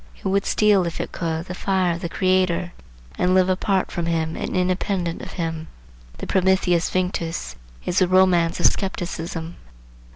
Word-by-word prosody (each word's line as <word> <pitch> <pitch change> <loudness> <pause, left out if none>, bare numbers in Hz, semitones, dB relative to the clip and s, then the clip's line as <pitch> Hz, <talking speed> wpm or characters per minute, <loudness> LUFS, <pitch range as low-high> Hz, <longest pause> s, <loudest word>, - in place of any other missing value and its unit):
It - - -20
would 195 +1 +1
steal 205 -4 +3
if 170 - -5
it - - -4
could 165 -1 -3
the 180 - -6
fire 185 -1 0
of 170 - -6
the 170 - -3
Creator, 185 -1 +1 0.5
and 180 +1 +3
live 185 0 +4
apart 190 +1 0
from 170 -1 -2
him 160 -1 -1
and - - -3
independent 180 -1 -1
of - - -8
him. 165 -2 -4 0.5
The - - -6
Prometheus 185 -2 +2
Vinctus 180 -2 -2 0.3
is 180 - +1
the 185 - +4
romance 180 -2 +3
of - - 0
skepticism. 170 -3 -1
180 Hz, 165 wpm, -22 LUFS, 170-185 Hz, 0.5 s, live